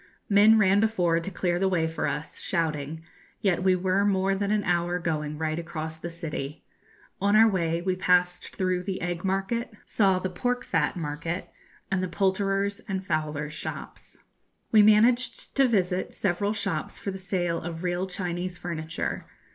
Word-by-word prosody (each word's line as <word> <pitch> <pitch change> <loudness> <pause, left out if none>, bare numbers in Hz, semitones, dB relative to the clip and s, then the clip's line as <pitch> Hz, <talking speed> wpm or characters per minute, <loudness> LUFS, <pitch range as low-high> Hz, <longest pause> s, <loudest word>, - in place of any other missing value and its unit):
Men 210 +2 +7
ran 200 -1 +4
before 180 -7 +2
to 170 - -5
clear 175 -2 -1
the 190 0 +2
way 170 -3 +1
for 160 0 -2
us, 150 - -4
shouting, 160 -2 -2 0.4
yet 190 -4 +1
we 185 0 +4
were 185 +2 +1
more 195 -1 +2
than 200 +1 -1
an 210 -1 +1
hour 175 0 +1
going 150 -3 -2
right 155 +1 -1
across 160 -1 -5
the 165 +2 -6
city. 155 -3 -5 0.6
On 200 +1 +3
our 220 +1 +8
way 170 -4 0
we 185 0 0
passed 180 -1 +1
through 185 -1 0
the 190 0 -4
egg 175 -1 -3
market, 195 +6 -1
saw 195 -3 +3
the 185 - -2
pork 245 +7 -2
fat - - 0
market, 165 +2 -4 0.4
and 195 -1 +1
the 185 - -1
poulterers' 195 +2 0
and 190 -2 -3
fowlers' 150 -2 -2
shops. - - -8 0.5
We 215 - +7
managed 225 +4 +3
to 270 -1 +6
visit 185 -5 0
several 200 +2 0
shops 165 -7 -3
for 200 - -4
the 190 - -6
sale 180 -3 -1
of 165 0 -6
real 180 +1 -1
Chinese 180 -1 -3
furniture. 165 -2 -4
180 Hz, 170 wpm, -27 LUFS, 165-195 Hz, 0.6 s, our